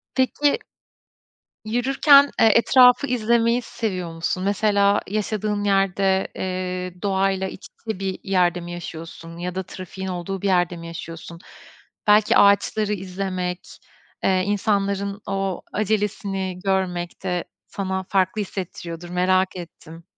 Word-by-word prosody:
Peki, 280 +2 +2 1.1
yürürken, 275 +5 +5
eee, - - +6
etrafı 250 +3 +6
izlemeyi 235 0 +2
seviyor 185 -7 -4
musun? 175 +2 -2
Mesela 200 0 +2
yaşadığın 210 0 -1
yerde, 195 -1 +2
eee, 180 -1 -4
doğayla 195 -1 +1
iç - - -10 0.2
içe 220 -4 -3
bir 190 -1 -3
yerde 180 -2 +2
mi 175 0 -8
yaşıyorsun 165 -1 -8
ya 180 +1 -4
da 190 - -2
trafiğin 185 +1 -8
olduğu 185 +1 -4
bir 200 - -1
yerde 175 -2 +2
mi 170 0 -9
yaşıyorsun? 165 0 -8 0.7
Belki 210 0 +5
ağaçları 205 +1 +3
izlemek, 185 -1 -4 0.6
eee, 185 -1 +2
insanların 200 0 0
o 195 -2 -2
acelesini 200 -3 -1
görmek 185 -2 -1
de 180 -2 -1 0.2
sana 190 -1 -3
farklı 190 +2 +1
hissettiriyordur, 175 -3 -6
merak 185 +1 +1
ettim. 165 -1 -10
190 Hz, 120 wpm, -23 LUFS, 180-205 Hz, 1.1 s, eee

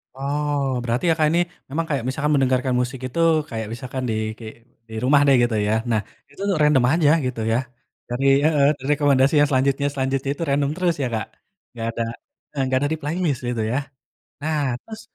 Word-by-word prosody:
Oh, 145 +1 -1 0.2
berarti 120 +5 -1
Kakak 160 -2 +3
ini, 170 - +3 0.3
memang 165 +4 -2
kayak 140 -5 -1
misalkan 145 +3 -1
mendengarkan 130 -1 +1
musik 125 +1 -4
itu, 130 +6 -5 0.3
kayak 110 -1 -4
misalkan 130 +2 -5
di, - - 0 0.2
ki 115 - -10 0.4
di - - -10
rumah 140 +2 +5
deh, 135 - +6
gitu 120 -2 +1
ya, 105 - +2 0.2
nah, 110 -2 +2 0.3
itu 145 - -22
tuh, 200 - -3
untuk 165 - -1
random 150 -4 +4
aja, 160 -3 +3 0.2
gitu 125 -3 -3
ya? 115 - +3 0.5
Dari 125 +3 -2 0.2
heeh, 150 -3 +4
dari 135 - -8
rekomendasi 140 -1 +3
yang 145 - +3
selanjutnya 140 +1 +1
selanjutnya 135 0 -1
itu - - -3
random 140 0 +1
terus 180 -2 +1
ya, 130 - 0
Kak? 110 - -2 0.5
Nggak 115 -2 -4
ada, 115 - +1 0.5
eee, 140 - -2
nggak 130 0 +1
ada - - 0
di - - -2
playlist, 155 -2 -1
gitu 120 -2 -2
ya? 125 - 0 0.6
Nah 150 -4 0
terus, 220 0 -10
135 Hz, 200 wpm, -22 LUFS, 125-150 Hz, 0.6 s, deh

